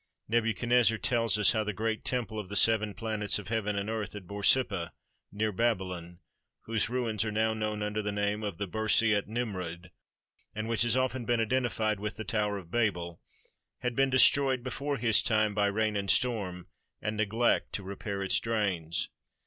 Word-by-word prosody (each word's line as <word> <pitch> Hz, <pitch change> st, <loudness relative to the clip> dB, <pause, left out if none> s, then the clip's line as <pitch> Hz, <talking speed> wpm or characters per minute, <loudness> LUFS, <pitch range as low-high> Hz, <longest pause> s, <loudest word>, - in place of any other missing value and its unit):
Nebu 115 Hz, 0 st, +1 dB
chadnezzar 120 Hz, -2 st, +3 dB
tells 115 Hz, -3 st, +1 dB
us 105 Hz, -3 st, +4 dB
how 110 Hz, -2 st, 0 dB
the 105 Hz, 0 st, -3 dB
great 110 Hz, +2 st, -2 dB
temple 115 Hz, -4 st, -2 dB
of 100 Hz, -3 st, -7 dB
the 100 Hz, -, -6 dB
Seven 110 Hz, -1 st, +3 dB
Planets 105 Hz, 0 st, -1 dB
of 105 Hz, -2 st, -8 dB
Heaven 105 Hz, -2 st, -1 dB
and 100 Hz, +1 st, -2 dB
Earth 110 Hz, -4 st, -4 dB
at 100 Hz, -3 st, -8 dB
Borsippa, 100 Hz, -2 st, +2 dB, 0.4 s
near 110 Hz, +1 st, -1 dB
Baby 115 Hz, -1 st, +1 dB
lon, 90 Hz, -1 st, -8 dB, 0.4 s
whose 115 Hz, 0 st, -1 dB
ruins 115 Hz, -4 st, -1 dB
are 110 Hz, -, -2 dB
now 110 Hz, +1 st, +1 dB
known 105 Hz, -1 st, -2 dB
under 105 Hz, +1 st, -2 dB
the 105 Hz, 0 st, -2 dB
name 105 Hz, +1 st, -1 dB
of 100 Hz, -5 st, -4 dB
the 100 Hz, -, -2 dB
Birs 110 Hz, +3 st, +2 dB
i 105 Hz, -2 st, +3 dB
Nimrud, 90 Hz, -7 st, -4 dB, 0.6 s
and 110 Hz, +1 st, -3 dB
which 115 Hz, -2 st, 0 dB
has 120 Hz, +1 st, +3 dB
often 130 Hz, -1 st, 0 dB
been 120 Hz, 0 st, +1 dB
identified 115 Hz, -3 st, 0 dB
with 105 Hz, +1 st, -4 dB
the 110 Hz, -, -6 dB
Tower 105 Hz, -3 st, -1 dB
of 90 Hz, -3 st, -11 dB
Babel, 90 Hz, -7 st, -1 dB, 0.6 s
had 125 Hz, -1 st, -2 dB
been 135 Hz, +1 st, +3 dB
destroyed 130 Hz, 0 st, +5 dB
before 140 Hz, +2 st, -3 dB
his 115 Hz, -3 st, +4 dB
time 110 Hz, -3 st, +1 dB
by 105 Hz, 0 st, +2 dB
rain 105 Hz, +1 st, 0 dB
and 100 Hz, -1 st, -2 dB
storm, 100 Hz, -8 st, +2 dB, 0.3 s
and 105 Hz, 0 st, -3 dB
neglect 110 Hz, +3 st, +1 dB
to 100 Hz, -, -3 dB
repair 100 Hz, +1 st, -5 dB
its 95 Hz, -, +2 dB
drains. 100 Hz, -8 st, -1 dB
110 Hz, 190 wpm, -29 LUFS, 100-115 Hz, 0.6 s, destroyed